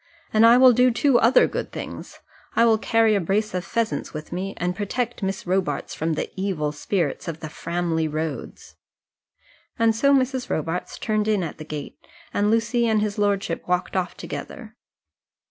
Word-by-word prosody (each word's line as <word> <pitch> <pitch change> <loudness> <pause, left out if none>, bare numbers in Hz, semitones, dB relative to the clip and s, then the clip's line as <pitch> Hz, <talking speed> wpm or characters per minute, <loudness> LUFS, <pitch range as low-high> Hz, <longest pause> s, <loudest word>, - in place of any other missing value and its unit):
And 220 +1 +6
I 235 +1 +7
will 255 -1 +7
do 250 +2 +5
two 250 +1 +3
other 235 +4 +5
good - - -4
things - - -8 0.3
I 230 - +5
will 220 -2 +4
carry 225 -1 +3
a 200 - +2
brace 205 +5 0
of 180 -1 -2
pheasants 225 -6 -2
with 155 0 -7
me, 190 +3 -4
and 180 0 -1
protect 235 +4 -3
Miss 195 0 -3
Robarts 180 -6 -1
from 160 +1 -1
the - - -3
evil 185 -6 -1
spirits 160 +2 -2
of 165 -1 -4
the 155 - -6
Framley 170 0 -2
roads." 155 -3 -5 1.0
And 225 -1 +3
so 280 +5 +3
Mrs. 260 -1 +1
Robarts 165 +3 -3
turned 215 -1 -1
in 210 -4 +2
at 160 - -6
the 155 - -7
gate, 150 -2 -7 0.3
and 205 +1 +2
Lucy 230 +2 +2
and 220 -1 +2
his 210 -1 -2
lordship 200 -4 0
walked 180 +1 -1
off 185 -2 -2
together. 225 -4 -8
200 Hz, 180 wpm, -23 LUFS, 170-230 Hz, 1.0 s, I